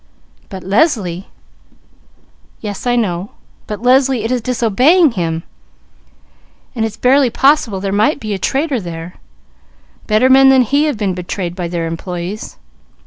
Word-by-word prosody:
But 190 Hz, -2 st, -8 dB
Leslie 195 Hz, -, 0 dB, 1.3 s
Yes, 205 Hz, +2 st, -6 dB
I 245 Hz, -, +2 dB
know, 195 Hz, -4 st, -2 dB, 0.3 s
but 210 Hz, +1 st, -6 dB
Leslie 260 Hz, -2 st, +3 dB
it 225 Hz, -, -2 dB
is 250 Hz, -1 st, 0 dB
disobeying 255 Hz, -, +3 dB
him, 165 Hz, -5 st, -3 dB, 1.3 s
and 230 Hz, -4 st, -2 dB
it's 225 Hz, 0 st, -3 dB
barely 260 Hz, +1 st, +3 dB
possible 245 Hz, -5 st, +2 dB
there 195 Hz, 0 st, -3 dB
might 215 Hz, +10 st, +1 dB
be 215 Hz, -5 st, -4 dB
a 195 Hz, -, -4 dB
traitor 275 Hz, -, -1 dB
there; 170 Hz, 0 st, -8 dB, 0.9 s
better 215 Hz, +4 st, +3 dB
men 270 Hz, +1 st, +6 dB
than 265 Hz, -1 st, +5 dB
he 285 Hz, +6 st, +1 dB
have 295 Hz, -7 st, -1 dB
been 200 Hz, -3 st, -1 dB
betrayed 180 Hz, 0 st, -5 dB
by 180 Hz, -2 st, -4 dB
their 170 Hz, -1 st, -3 dB
employees. 175 Hz, +5 st, -6 dB
215 Hz, 140 wpm, -16 LUFS, 185-260 Hz, 1.3 s, men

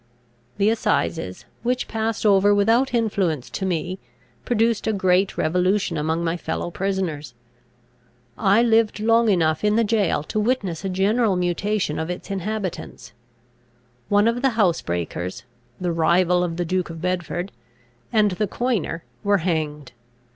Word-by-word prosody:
The 205 Hz, +2 st, +3 dB
assizes, 90 Hz, -, -1 dB, 0.2 s
which 250 Hz, +2 st, -1 dB
passed 225 Hz, 0 st, -2 dB
over 205 Hz, 0 st, +5 dB
without 225 Hz, +6 st, +3 dB
influence 190 Hz, -, 0 dB
to 190 Hz, +8 st, -3 dB
me, 180 Hz, +1 st, -2 dB, 0.5 s
produced 230 Hz, -2 st, +1 dB
a 220 Hz, -, +2 dB
great 190 Hz, 0 st, +2 dB
revolution 180 Hz, +3 st, +1 dB
among 160 Hz, +2 st, -1 dB
my 170 Hz, +1 st, -1 dB
fellow 165 Hz, +1 st, -4 dB
prisoners. 170 Hz, -9 st, -3 dB, 1.0 s
I 200 Hz, -, +3 dB
lived 225 Hz, -2 st, +2 dB
long 230 Hz, +1 st, +3 dB
enough 160 Hz, -4 st, +2 dB
in 210 Hz, 0 st, +3 dB
the 230 Hz, -, +3 dB
jail 205 Hz, -8 st, +1 dB
to 215 Hz, -, -3 dB
witness 210 Hz, -7 st, -1 dB
a 195 Hz, -, -2 dB
general 200 Hz, +3 st, +2 dB
mutation 180 Hz, 0 st, -1 dB
of 160 Hz, +1 st, -3 dB
its 180 Hz, +3 st, -6 dB
inhabitants. 190 Hz, -, -4 dB, 1.0 s
One 205 Hz, +2 st, +4 dB
of 235 Hz, +1 st, 0 dB
the 265 Hz, -4 st, +1 dB
housebreakers 90 Hz, -, -1 dB, 0.4 s
(the 180 Hz, -1 st, -1 dB
rival 175 Hz, +2 st, +3 dB
of 170 Hz, -1 st, -3 dB
the 175 Hz, -, -1 dB
Duke 180 Hz, +1 st, -1 dB
of 165 Hz, -1 st, -7 dB
Bedford), 180 Hz, +1 st, -2 dB, 0.6 s
and 215 Hz, -3 st, +3 dB
the 205 Hz, +3 st, -1 dB
coiner, 210 Hz, -7 st, -2 dB, 0.2 s
were 200 Hz, -1 st, +3 dB
hanged. 155 Hz, -5 st, -2 dB
190 Hz, 140 wpm, -23 LUFS, 165-215 Hz, 1.0 s, over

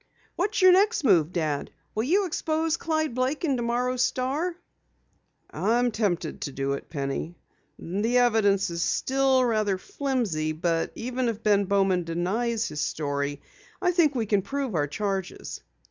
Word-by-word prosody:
"What's 395 Hz, +1 st, 0 dB
your 370 Hz, -, +9 dB
next 400 Hz, +1 st, +3 dB
move, 175 Hz, -, +4 dB
Dad? 155 Hz, -5 st, -2 dB, 0.2 s
Will 215 Hz, -, 0 dB
you 385 Hz, +8 st, +3 dB
expose 320 Hz, -1 st, 0 dB
Clyde 315 Hz, -4 st, -1 dB
Blake 260 Hz, +6 st, -1 dB
in 280 Hz, -4 st, +1 dB
tomorrow's 245 Hz, +1 st, 0 dB
Star?" 270 Hz, +7 st, 0 dB, 1.0 s
"I'm 240 Hz, +2 st, +1 dB
tempted 185 Hz, -7 st, -1 dB
to 140 Hz, -, -3 dB
do 135 Hz, +1 st, -2 dB
it, 140 Hz, -, -6 dB
Penny. 140 Hz, +3 st, -3 dB, 0.4 s
The 210 Hz, +8 st, 0 dB
evidence 220 Hz, -5 st, +3 dB, 0.2 s
still 265 Hz, +6 st, +2 dB
is -, -, +3 dB
rather 215 Hz, -4 st, +1 dB
flimsy, 235 Hz, -, -2 dB
but 165 Hz, 0 st, -1 dB
even 250 Hz, +1 st, -2 dB
if 225 Hz, -1 st, -5 dB
Ben 205 Hz, -1 st, +3 dB
Bowman 195 Hz, -2 st, +2 dB
denies 215 Hz, +8 st, -1 dB
his 150 Hz, 0 st, -4 dB
story, 145 Hz, -1 st, -2 dB, 0.4 s
I 360 Hz, -2 st, +2 dB
think 330 Hz, -5 st, +3 dB
we 230 Hz, -3 st, 0 dB
can 205 Hz, -1 st, +2 dB
prove 275 Hz, +2 st, -3 dB
our 145 Hz, -3 st, +1 dB
charges." 195 Hz, +2 st, -4 dB
225 Hz, 150 wpm, -26 LUFS, 175-270 Hz, 1.0 s, your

